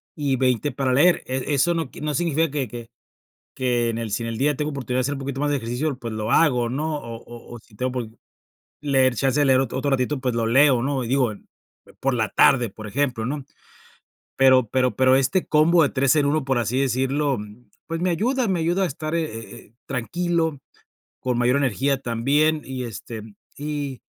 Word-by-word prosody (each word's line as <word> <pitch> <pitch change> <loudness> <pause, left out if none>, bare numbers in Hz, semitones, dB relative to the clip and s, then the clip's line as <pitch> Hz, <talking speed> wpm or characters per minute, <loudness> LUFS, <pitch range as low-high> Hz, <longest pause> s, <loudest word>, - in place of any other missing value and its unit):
y 145 -3 0
20 130 +2 +1
para 130 -2 -1
leer. 170 +7 +4
E 130 +3 -2
eso 170 +6 +3
no 165 -5 -2
qui - - -11
no 150 0 -2
significa 165 -1 +1
que 140 -3 -2
que 115 +1 -9 0.7
que 125 -3 +1
en 115 - -4
el 115 -2 -4
si 115 - -1
en 115 - -3
el 115 - -5
día 145 +2 +1
tengo 150 0 -2
oportunidad 130 -2 -3
de - - +2
hacer 145 +3 -1
un 140 - -6
poquito 135 0 -4
más 145 - +1
de 145 - +1
ejercicio, 125 +5 -2
pues 115 -3 -6
lo 110 +1 -2
hago, 125 -7 +3
¿no?, 150 +4 -2
o 115 -3 -7
o 120 0 -11
o - - -9
si 110 -1 -22
tengo 130 +4 -1
un - - -5
poquito 115 -3 -5 0.6
leer 135 -3 +3
chance 135 +4 +1
de 145 - +3
leer 130 -1 +4
otro 130 -1 -2
otro 140 +1 -1
ratito, 135 +1 0
pues 125 -2 -1
lo 115 -1 0
leo, 130 +1 +4
¿no?, 135 0 -1
y - - -5
digo, 130 -3 +2 0.7
por 135 0 +1
la 110 -3 0
tarde, 125 -4 +4
por 110 +2 -10
ejemplo, 125 -1 -1
¿no?, 140 +1 -4 0.9
pero 130 -2 +5
pero 125 -2 +1
pero 130 +2 +4
este 155 +8 +1
combo 160 +3 +4
de 140 - +2
3 135 +2 +2
en 145 - +3
1, 150 -1 0
por 130 -2 +1
así 120 +3 0
decirlo, 135 +1 0 0.5
pues, 165 0 -3
me 180 0 +1
ayuda 245 +8 0
me 185 -3 0
ayuda 175 +4 +1
a 185 - +2
estar, 155 0 -4
eh, 165 - +1
eh, 115 -6 -8
eh, 105 - -30
tranquilo, 160 +3 -1 0.6
con 125 -1 -1
mayor 125 +3 +3
energía 135 +1 +1
también, 145 +6 +1
y 130 -1 -5
este, 115 +1 -7 0.4
y 145 -3 -4
135 Hz, 220 wpm, -23 LUFS, 120-150 Hz, 0.9 s, pero